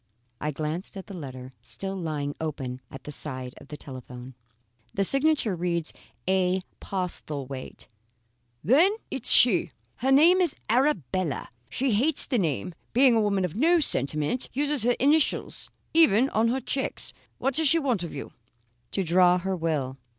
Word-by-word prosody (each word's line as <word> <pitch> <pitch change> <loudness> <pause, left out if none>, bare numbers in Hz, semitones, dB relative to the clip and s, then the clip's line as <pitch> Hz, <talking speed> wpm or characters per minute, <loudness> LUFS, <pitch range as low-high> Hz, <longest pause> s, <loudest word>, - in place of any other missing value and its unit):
I 150 - -2
glanced 155 +6 -4
at 190 - -7
the 200 - -10
letter 130 -5 -8
still 195 0 -5
lying 150 -5 -3
open 130 -5 -4
at 135 - -10
the 150 - -7
side 130 -2 -6
of - - -14
the 150 - -8
telephone: 130 -2 -10 0.6
"The 195 - +2
signature 275 - +3
reads 170 -1 -2 0.3
A. 185 0 +2 0.2
Postlethwaite." 145 -8 -5 0.8
"Then 300 - +5 0.2
it's 265 - -2
she. 180 - +5 0.2
Her 265 +2 0
name 335 +7 +6
is 345 -6 +1 0.2
Arabella. 185 - 0 0.2
She 265 - 0
hates 265 +9 +2
the 250 - 0
name, 160 - -1 0.2
being 255 +1 +6
a 225 - +3
woman 200 -3 +1
of 170 - -5
no 335 +9 +4
sentiment. 155 - 0
Uses 290 0 +1
her 245 +3 +3
initials 295 +3 +1 0.2
even 270 -6 +5
on 220 +1 +2
her 250 +3 0
cheques. 270 +1 -2 0.2
What 270 - 0
does 320 +3 +3
she 330 - +4
want 260 - 0
of 170 - -5
you?" 140 - -7 0.6
"To 195 - 0
draw 180 +1 +4
her 190 +1 -2
will." 150 -6 -2
185 Hz, 160 wpm, -26 LUFS, -, 0.8 s, name